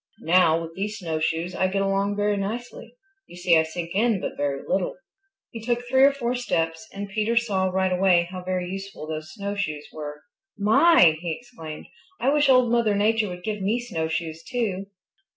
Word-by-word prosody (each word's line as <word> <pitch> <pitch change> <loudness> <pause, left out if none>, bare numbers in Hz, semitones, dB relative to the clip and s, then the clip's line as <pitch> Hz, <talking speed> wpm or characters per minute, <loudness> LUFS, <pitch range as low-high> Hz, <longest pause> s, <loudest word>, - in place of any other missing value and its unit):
Now, 165 -1 +4
with 165 0 -7
these 210 +2 -3
snowshoes 165 0 -2
I 185 - +1
get 195 +1 0
along 195 +1 0
very 205 0 +1
nicely. 230 +3 -5 0.3
You - - -13
see 175 -1 +3
I 160 - +6
sink 165 +1 -5
in 220 +1 +2
but - - -4
very 140 -1 -2
little." - - 0 0.6
He 225 - -7
took 240 +1 -1
three 260 +2 +3
or 275 +1 +8
four 250 -3 -2
steps 165 -6 -2
and 200 +1 -6
Peter 215 +3 -1
saw 200 -6 +2
right 190 0 0
away 180 -1 +4
how 185 -1 -6
very 180 -1 -2
useful 195 -3 -6
those 155 0 -6
snowshoes 200 -7 -3
were. 150 -1 -7 0.3
"My!" 205 - +5
he 175 -2 -3
exclaimed. 165 -9 -9 0.3
"I 255 - +2
wish 295 -1 +3
Old 255 -2 +5
Mother 230 -3 +2
Nature 215 +1 +2
would 180 0 -8
give 210 0 -3
me 210 +5 +1
snowshoes 160 -6 -3
too." 195 -2 -3
195 Hz, 185 wpm, -24 LUFS, 165-225 Hz, 0.6 s, or